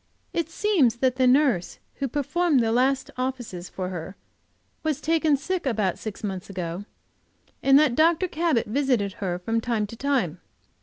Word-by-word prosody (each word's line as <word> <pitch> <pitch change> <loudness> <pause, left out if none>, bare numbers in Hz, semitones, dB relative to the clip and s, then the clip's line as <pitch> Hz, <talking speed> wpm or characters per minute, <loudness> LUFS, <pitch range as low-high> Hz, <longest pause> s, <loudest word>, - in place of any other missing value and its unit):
It 335 -2 -1
seems 330 - +2
that 255 +1 +1
the 255 -1 +4
nurse 255 - +3 0.2
who 275 - -1
performed 295 +3 +1
the 225 -1 +1
last 265 +3 +1
offices 245 -9 -4
for 185 -1 -4
her 180 +1 -6 0.7
was 310 -3 -1
taken 315 -1 +2
sick 345 +3 -3
about 210 -7 0
six 215 0 -7
months 190 -3 -4
ago, 180 0 -5 0.8
and 270 0 +6
that 295 -4 +4
Dr. 330 +6 +3
Cabot 325 -7 +1
visited 240 -4 0
her 180 -3 -1
from 225 +6 -1
time 225 -2 0
to 210 - -9
time. 235 - 0
255 Hz, 160 wpm, -25 LUFS, 205-290 Hz, 0.8 s, and